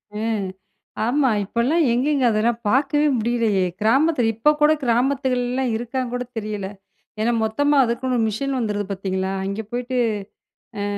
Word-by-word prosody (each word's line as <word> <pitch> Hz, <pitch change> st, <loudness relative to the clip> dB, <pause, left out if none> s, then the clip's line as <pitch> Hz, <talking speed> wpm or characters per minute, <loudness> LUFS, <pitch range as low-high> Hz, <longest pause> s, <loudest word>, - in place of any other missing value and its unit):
ம். 215 Hz, -2 st, -1 dB, 0.6 s
ஆமா, 265 Hz, +2 st, +2 dB, 0.2 s
இப்போலாம் 255 Hz, -, +1 dB
எங்கேங்க 270 Hz, +2 st, +1 dB
அதெல்லா 220 Hz, +2 st, +2 dB, 0.2 s
பார்க்கவே 290 Hz, +4 st, +2 dB
முடியலையே, 225 Hz, -4 st, +1 dB, 0.2 s
கிராமத்தில 250 Hz, +1 st, +3 dB
இப்போ 265 Hz, +7 st, +4 dB
கூட 300 Hz, +1 st, +6 dB
கிராமத்துகள்லலாம் 250 Hz, 0 st, 0 dB
இருக்கான்னு 240 Hz, +2 st, -3 dB
கூட 250 Hz, 0 st, -2 dB
தெரியல. 210 Hz, -3 st, -3 dB, 0.5 s
ஏனா 235 Hz, +2 st, +2 dB
மொத்தமா 285 Hz, +7 st, +1 dB
அதுக்குன்னு 250 Hz, +1 st, -1 dB
ஒரு 225 Hz, -, +2 dB
மிஷின் 270 Hz, +5 st, -2 dB
வந்துருது 205 Hz, -3 st, -1 dB
பார்த்தீங்களா, 190 Hz, 0 st, -2 dB
அங்க 200 Hz, +3 st, -3 dB
போயிட்டு 250 Hz, +1 st, -3 dB, 0.8 s
அ. -, -, -1 dB
240 Hz, 130 wpm, -22 LUFS, 220-265 Hz, 0.8 s, கூட